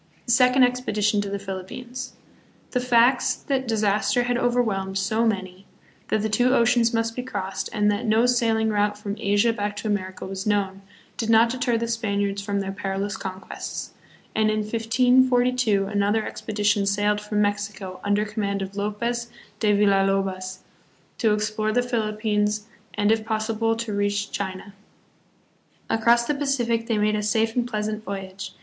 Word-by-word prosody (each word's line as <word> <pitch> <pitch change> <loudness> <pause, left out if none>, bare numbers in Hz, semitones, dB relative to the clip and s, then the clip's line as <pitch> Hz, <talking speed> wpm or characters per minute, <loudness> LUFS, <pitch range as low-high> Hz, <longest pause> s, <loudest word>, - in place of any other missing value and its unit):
The - - -1
Second 250 +2 +5
Expedition 215 -4 +1
to 200 - -4
the 200 - -2
Philippines. 200 +7 -7 0.6
The 250 - +1
facts 245 +1 +3
that 265 -2 -2
disaster 210 +1 +1
had 245 0 0
overwhelmed 220 -6 0
so 220 +4 +1
many, 190 -2 -3 0.4
that 215 0 0
two 250 +4 +3
oceans 235 -1 +3
must 225 -1 -1
be 250 - -2
crossed, 200 -7 -4
and 210 0 +2
that 210 +3 -2
no 220 +2 +4
sailing 225 -3 +2
route 205 -1 +1
from 205 -1 -5
Asia 205 +2 +2
back 205 -1 -3
to 220 - -5
America 190 -3 -3
was 190 +1 -5
known, 195 -2 0 0.4
did 225 - -2
not 230 +1 +5
deter 250 -2 0
the 230 +1 -2
Spaniards 200 -3 -1
from 200 0 -2
their 195 0 -3
perilous 195 +1 -3
conquests; 190 0 -6 0.4
and 215 0 +2
in 215 0 0
1542 245 0 +2
another 205 +2 0
expedition 210 -1 0
sailed 205 +1 +1
from 210 0 -2
Mexico, 205 -2 -3
under 205 +1 +1
command 200 -2 -2
of 190 +1 -8
Lopez 235 +4 -2 0.3
de 210 -2 +3
Villa 200 -1 +4
lobos, 190 -1 -2 0.6
to 220 - +3
explore 215 +1 0
the 245 +2 +2
Philippines 215 -2 -1 0.3
and 210 0 +2
if 225 -1 +2
possible 225 0 0
to 225 -2 -4
reach 205 0 -1
China. 190 0 -5 1.2
Across 235 +1 +4
the 295 - 0
Pacific 240 -5 0
they 225 -3 +1
made 210 0 +2
a 210 - -1
safe 220 +2 +1
and 245 -1 +1
pleasant 215 -1 -3
voyage. 195 -1 -6
215 Hz, 160 wpm, -24 LUFS, 200-235 Hz, 1.2 s, Second